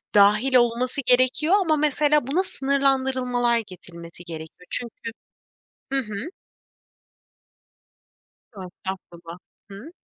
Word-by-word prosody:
dâhil 210 +6 +5
olması 245 +3 +2
gerekiyor 255 +7 +3
ama 320 -4 +2
mesele 295 -1 +2
buna 350 +7 +1
sınırlandırılmalar 260 -5 +1
getirilmesi 170 -1 -12
gerekiyor. 165 +1 -10
Çünkü 230 -1 -3 0.8
Hı 275 - +2
hı. 215 +1 -4 2.3
Yo, 195 - -8
estağfurullah. 175 -2 -9 0.3
Hıı 215 +12 -10
245 Hz, 90 wpm, -24 LUFS, 195-275 Hz, 2.3 s, dâhil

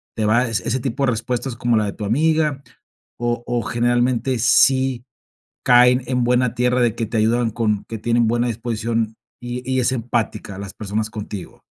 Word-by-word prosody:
¿te 110 -2 -1
va 120 +4 +3
e - - -4
ese 120 +3 -1
tipo 135 +2 -1
de 125 - +2
respuestas 120 +2 -3
como 120 -1 +1
la 105 - +1
de 100 - -3
tu 105 - -7
amiga, 150 +4 +1 0.6
o 120 0 -1
o, 120 -1 0
generalmente 120 +2 +1
sí 130 +2 +3 0.6
caen 125 +1 +5
en 125 -2 0
buena 125 0 +2
tierra 125 +1 +1
de 115 -2 +2
que 115 - -2
te 115 +1 -2
ayudan 115 +1 +2
con 105 -3 -1
que 115 - -6
tienen 115 +1 +1
buena 120 +1 +1
disposición, 115 -1 -2 0.3
y 120 +1 -5
y 130 0 +2
es 125 +1 +1
empática, 115 -5 -3
las 100 -1 -7
personas 110 +1 -3
contigo? 105 -3 -8
120 Hz, 185 wpm, -21 LUFS, 110-125 Hz, 0.6 s, caen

